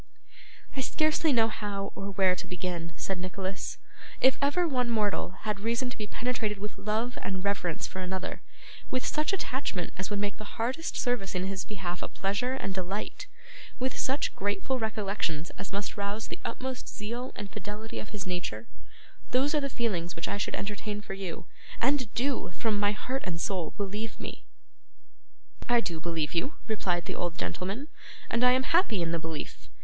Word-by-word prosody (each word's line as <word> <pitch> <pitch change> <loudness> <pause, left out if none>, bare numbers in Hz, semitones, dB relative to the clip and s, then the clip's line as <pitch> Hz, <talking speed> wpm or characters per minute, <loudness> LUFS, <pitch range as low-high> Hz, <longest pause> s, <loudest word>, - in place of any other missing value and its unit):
'I 270 - +1
scarcely 310 +3 +3
know 225 -4 +6
how, 205 -3 -2
or 195 - -3
where, 190 -2 +5
to - - -5
begin,' 175 -2 -2
said 190 -2 -1
Nicholas. 185 +1 -2 0.4
'If 260 - +7
ever 315 +5 +4
one 250 -5 +2
mortal 210 -5 +2
had 210 -2 0
reason 235 +4 +1
to - - -5
be 210 -2 -2
penetrated 225 -2 0
with 205 +1 -4
love 220 +4 0
and 185 -1 -1
reverence 195 -5 +1
for 190 - -4
another: 185 0 -2 0.5
with 255 - +1
such 305 +3 +2
attachment 260 - -1
as 190 - 0
would 205 - 0
make 205 0 0
the 215 - -8
hardest 255 +8 0
service 245 -7 +1
in 180 +1 +1
his 195 0 -1
behalf 185 -4 -3
a - - -1
pleasure 200 +6 0
and 195 -7 -2
delight: 190 +2 -2 0.5
with 260 +1 0
such 270 +3 +1
grateful 205 +6 +1
recollections 200 -7 0
as 200 - -4
must 200 +1 -1
rouse 205 +1 -1
the - - -4
utmost 255 +2 -3
zeal 235 +4 -3
and 200 -2 -5
fidelity 210 +2 -4
of - - -6
his 205 -3 -4
nature: 175 -12 -2 0.6
those 265 +4 +4
are 300 - +4
the 275 - 0
feelings 190 -9 0
which 165 - -1
I 205 - 0
should - - 0
entertain 210 +1 -2
for 200 - -5
you, 190 -3 -4 0.3
and 255 -3 +3
do, 260 +3 +2
from 215 -3 +2
my 205 0 +4
heart 255 +5 -2
and 165 -2 -1
soul, 175 -3 0
believe 210 +2 -2
me!' - - -6 1.2
'I 240 -1 +7
do 170 -7 -2
believe 160 -3 0
you,' 175 - +1
replied 180 -6 +1
the - - -2
old 175 -1 -1
gentleman, 200 +10 -2 0.4
'and 230 +2 +3
I 250 0 +8
am 260 +1 +4
happy 260 - +4
in 165 - +1
the 170 - +2
belief. 160 -2 -5
205 Hz, 180 wpm, -31 LUFS, 185-245 Hz, 1.2 s, I